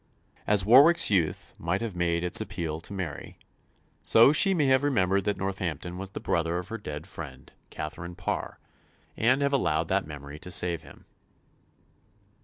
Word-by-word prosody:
As 105 Hz, -2 st, +3 dB
Warwick's 140 Hz, +7 st, +6 dB
youth 85 Hz, -6 st, 0 dB
may 85 Hz, +3 st, -1 dB
have 110 Hz, -3 st, -5 dB
made 85 Hz, -1 st, 0 dB
its 90 Hz, +4 st, +4 dB
appeal 85 Hz, -7 st, -4 dB
to 85 Hz, -, -10 dB
Mary, 90 Hz, -6 st, -6 dB, 0.6 s
so 115 Hz, +4 st, +6 dB
she 195 Hz, +6 st, +4 dB
may 165 Hz, -6 st, +2 dB
have 130 Hz, 0 st, +3 dB
remembered 100 Hz, -8 st, +1 dB
that 105 Hz, -1 st, 0 dB
Northampton 90 Hz, -3 st, -4 dB
was 95 Hz, 0 st, -6 dB
the -, -, -7 dB
brother 85 Hz, +1 st, -1 dB
of 90 Hz, -, -6 dB
her 115 Hz, -, -5 dB
dead 75 Hz, -5 st, -7 dB
friend, 70 Hz, -9 st, -10 dB, 0.2 s
Katherine 85 Hz, +3 st, -7 dB
Parr, -, -, -4 dB, 0.6 s
and 130 Hz, +5 st, +2 dB
have 140 Hz, 0 st, 0 dB
allowed 80 Hz, -, +1 dB
that 95 Hz, -3 st, 0 dB
memory 75 Hz, 0 st, -9 dB
to 90 Hz, -, -8 dB
save 85 Hz, -2 st, 0 dB
him. -, -, -16 dB
90 Hz, 165 wpm, -27 LUFS, 85-110 Hz, 0.6 s, Warwick's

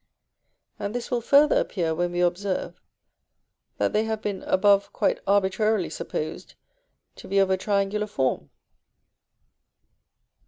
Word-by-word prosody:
And 205 Hz, +3 st, -4 dB
this 245 Hz, +1 st, -4 dB
will 245 Hz, -1 st, 0 dB
farther 285 Hz, +5 st, +5 dB
appear 165 Hz, -4 st, -1 dB
when 175 Hz, +2 st, -1 dB
we 175 Hz, 0 st, -1 dB
observe 185 Hz, +2 st, -1 dB, 1.0 s
that -, -, 0 dB
they 215 Hz, +1 st, +2 dB
have 220 Hz, -1 st, -2 dB
been 205 Hz, -3 st, -4 dB
above 200 Hz, +1 st, +3 dB
quite -, -, 0 dB
arbitrarily 200 Hz, 0 st, +1 dB
supposed 155 Hz, -, -5 dB, 0.6 s
to -, -, -11 dB
be 195 Hz, -, -1 dB
of 195 Hz, -1 st, +3 dB
a -, -, +4 dB
triangular 205 Hz, +1 st, -1 dB
form. 130 Hz, -, -1 dB
200 Hz, 125 wpm, -25 LUFS, 185-215 Hz, 1.0 s, farther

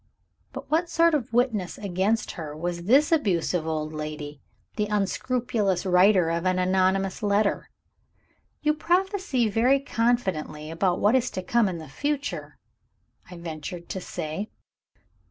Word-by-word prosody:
But -, -, -9 dB
what 335 Hz, +2 st, +2 dB
sort 335 Hz, 0 st, +3 dB
of 265 Hz, -4 st, -1 dB
witness 230 Hz, -6 st, 0 dB
against 200 Hz, +3 st, 0 dB
her 155 Hz, -3 st, -7 dB
was 170 Hz, +1 st, -4 dB
this 280 Hz, -, +4 dB
abusive 180 Hz, -, +1 dB
old 155 Hz, -1 st, -2 dB
lady, 150 Hz, -1 st, -6 dB, 0.3 s
the 210 Hz, -1 st, 0 dB
unscrupulous 210 Hz, -1 st, 0 dB
writer 180 Hz, -1 st, +4 dB
of 170 Hz, 0 st, -1 dB
an 185 Hz, 0 st, +2 dB
anonymous 190 Hz, +1 st, +1 dB
letter? 205 Hz, 0 st, +1 dB, 0.9 s
"You 300 Hz, 0 st, +3 dB
prophesy 360 Hz, -, +1 dB
very 240 Hz, +6 st, +3 dB
confidently 195 Hz, -, -1 dB
about 175 Hz, +2 st, 0 dB
what 210 Hz, +3 st, +3 dB
is 255 Hz, -1 st, +2 dB
to 185 Hz, -, -5 dB
come 235 Hz, 0 st, +2 dB
in 180 Hz, -, -4 dB
the 160 Hz, -1 st, -9 dB
future," 290 Hz, -, -3 dB, 0.7 s
I 180 Hz, -, -9 dB
ventured 170 Hz, +1 st, -7 dB
to 190 Hz, -, -4 dB
say. 175 Hz, +4 st, -5 dB
195 Hz, 135 wpm, -26 LUFS, 170-245 Hz, 0.9 s, this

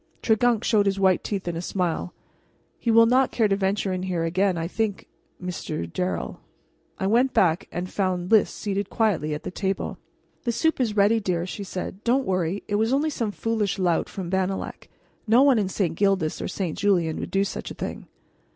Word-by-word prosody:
Tregunc 230 Hz, 0 st, +3 dB
showed 205 Hz, -3 st, +3 dB
his 195 Hz, 0 st, 0 dB
white 190 Hz, -2 st, +3 dB
teeth 195 Hz, -3 st, -3 dB
in 170 Hz, -, -2 dB
a 165 Hz, -, -3 dB
smile. 180 Hz, -1 st, -2 dB, 0.7 s
"He 235 Hz, -, -2 dB
will 230 Hz, 0 st, +7 dB
not 255 Hz, +3 st, +4 dB
care 225 Hz, -3 st, +2 dB
to 195 Hz, -, +2 dB
venture 195 Hz, 0 st, 0 dB
in 185 Hz, -, -2 dB
here 180 Hz, -3 st, -1 dB
again, 185 Hz, +2 st, +1 dB
I 165 Hz, 0 st, -2 dB
think, 210 Hz, +1 st, -2 dB, 0.3 s
Monsieur 175 Hz, -, -4 dB
Darrel." 90 Hz, +1 st, -3 dB, 0.6 s
I 190 Hz, -, -2 dB
went 240 Hz, +6 st, +2 dB
back 170 Hz, -2 st, +3 dB
and 180 Hz, +1 st, -3 dB
found 185 Hz, -1 st, -1 dB
Lys 220 Hz, -3 st, +5 dB
seated 200 Hz, -1 st, -3 dB
quietly 170 Hz, -9 st, +1 dB
at 150 Hz, -, -7 dB
the -, -, -5 dB
table. 195 Hz, 0 st, -3 dB, 0.4 s
"The 240 Hz, -, 0 dB
soup 320 Hz, +8 st, +1 dB
is 220 Hz, -4 st, 0 dB
ready, 205 Hz, +3 st, +4 dB
dear," 180 Hz, -4 st, -1 dB
she 200 Hz, +2 st, -6 dB
said. 190 Hz, +1 st, -6 dB
"Don't 260 Hz, +3 st, +2 dB
worry; 185 Hz, 0 st, -1 dB
it 205 Hz, -, 0 dB
was 225 Hz, +2 st, +1 dB
only 295 Hz, +4 st, +2 dB
some 230 Hz, -6 st, -2 dB
foolish 215 Hz, -2 st, -1 dB
lout 175 Hz, -3 st, +1 dB
from 180 Hz, -3 st, -6 dB
Bannalec. 190 Hz, 0 st, -2 dB, 0.4 s
No 235 Hz, +5 st, +6 dB
one 270 Hz, -5 st, +5 dB
in 195 Hz, -3 st, 0 dB
St. 185 Hz, -4 st, -1 dB
Gildas 195 Hz, -5 st, +1 dB
or -, -, -2 dB
St. 180 Hz, -5 st, -3 dB
Julien 175 Hz, -6 st, +1 dB
would -, -, -4 dB
do 195 Hz, 0 st, +2 dB
such 200 Hz, -, -5 dB
a -, -, -8 dB
thing." -, -, -6 dB
195 Hz, 200 wpm, -25 LUFS, 180-220 Hz, 0.7 s, will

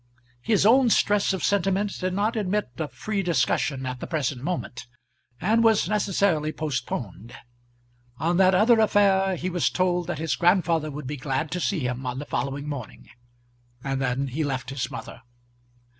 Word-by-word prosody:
His 205 Hz, -, +2 dB
own 250 Hz, +3 st, +5 dB
stress 205 Hz, -2 st, +3 dB
of 190 Hz, -, -3 dB
sentiment 200 Hz, 0 st, 0 dB
did 185 Hz, 0 st, -2 dB
not 210 Hz, +4 st, 0 dB
admit 210 Hz, -, -1 dB
of 155 Hz, -2 st, -3 dB
free 215 Hz, -2 st, -3 dB
discussion 155 Hz, -6 st, 0 dB
at 125 Hz, 0 st, -4 dB
the -, -, -6 dB
present 140 Hz, -6 st, -2 dB
moment, 145 Hz, -6 st, -4 dB, 0.5 s
and 220 Hz, -, +2 dB
was 220 Hz, -4 st, +4 dB
necessarily 195 Hz, -6 st, +1 dB
postponed. 125 Hz, -, -5 dB, 0.8 s
On 170 Hz, +5 st, 0 dB
that 190 Hz, 0 st, +5 dB
other 225 Hz, +4 st, +5 dB
affair 195 Hz, -3 st, +3 dB
he 185 Hz, +2 st, -3 dB
was 175 Hz, -1 st, +1 dB
told 180 Hz, -1 st, 0 dB
that -, -, -3 dB
his 160 Hz, 0 st, -1 dB
grandfather 170 Hz, -3 st, +2 dB
would 150 Hz, -1 st, -7 dB
be 145 Hz, +3 st, -4 dB
glad 135 Hz, +3 st, -2 dB
to 180 Hz, -, -2 dB
see 175 Hz, -1 st, -1 dB
him 125 Hz, 0 st, -3 dB
on 125 Hz, 0 st, -3 dB
the 145 Hz, -, -5 dB
following 140 Hz, +2 st, -3 dB
morning; 135 Hz, -7 st, -7 dB, 0.7 s
and 135 Hz, -1 st, -2 dB
then 130 Hz, +1 st, -1 dB
he 150 Hz, +5 st, -2 dB
left 130 Hz, -3 st, -3 dB
his 135 Hz, -1 st, -3 dB
mother. -, -, -8 dB
170 Hz, 170 wpm, -25 LUFS, 135-195 Hz, 0.8 s, own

